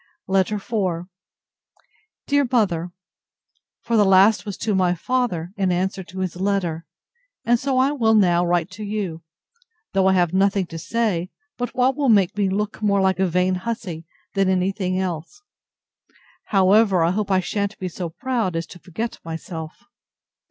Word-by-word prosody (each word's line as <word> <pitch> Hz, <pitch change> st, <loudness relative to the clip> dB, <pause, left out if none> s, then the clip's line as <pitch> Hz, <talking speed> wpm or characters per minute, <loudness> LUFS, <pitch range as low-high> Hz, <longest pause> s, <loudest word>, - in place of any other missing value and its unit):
LETTER 190 Hz, +2 st, +2 dB
IV 190 Hz, -5 st, -2 dB, 1.2 s
DEAR 285 Hz, -2 st, +2 dB
MOTHER, 180 Hz, -8 st, +1 dB, 0.9 s
For 235 Hz, -, 0 dB
the 210 Hz, -, +5 dB
last 195 Hz, +3 st, +5 dB
was 200 Hz, -, -5 dB
to 215 Hz, -1 st, -1 dB
my 180 Hz, -2 st, +2 dB
father, 180 Hz, -5 st, -1 dB
in 190 Hz, -2 st, +1 dB
answer 190 Hz, +2 st, -1 dB
to 185 Hz, +2 st, -7 dB
his 185 Hz, -2 st, -3 dB
letter; 180 Hz, -5 st, -1 dB, 0.6 s
and 240 Hz, 0 st, +3 dB
so 265 Hz, 0 st, -1 dB
I 265 Hz, +2 st, +3 dB
will 225 Hz, -6 st, +2 dB
now 175 Hz, -4 st, +4 dB
write 175 Hz, +1 st, 0 dB
to 210 Hz, +3 st, -8 dB
you; 200 Hz, -6 st, -3 dB, 0.7 s
though 190 Hz, -1 st, +3 dB
I 190 Hz, -, +4 dB
have 175 Hz, -2 st, +2 dB
nothing 195 Hz, 0 st, +2 dB
to 165 Hz, -1 st, -8 dB
say, 200 Hz, -3 st, -1 dB, 0.3 s
but 245 Hz, -1 st, -4 dB
what 255 Hz, +1 st, +2 dB
will 280 Hz, -2 st, +1 dB
make 200 Hz, -3 st, +4 dB
me 200 Hz, -2 st, +1 dB
look 210 Hz, +3 st, -2 dB
more 200 Hz, -2 st, +2 dB
like 190 Hz, -1 st, +2 dB
a 190 Hz, -, +3 dB
vain 180 Hz, +2 st, +1 dB
hussy, 185 Hz, -4 st, -5 dB, 0.3 s
than 195 Hz, -1 st, +2 dB
any 185 Hz, 0 st, +2 dB
thing 185 Hz, -2 st, -2 dB
else: 180 Hz, -, -4 dB, 1.0 s
However, 195 Hz, -1 st, +4 dB
I 165 Hz, -, +2 dB
hope 205 Hz, +1 st, -2 dB
I 190 Hz, -1 st, +3 dB
shan't 200 Hz, +2 st, -2 dB
be 185 Hz, -, -4 dB
so 175 Hz, 0 st, -5 dB
proud 230 Hz, -1 st, -2 dB
as 165 Hz, 0 st, -2 dB
to 180 Hz, -, -14 dB
forget 220 Hz, +8 st, -5 dB
myself. 160 Hz, +3 st, -7 dB
190 Hz, 165 wpm, -22 LUFS, 180-215 Hz, 1.2 s, the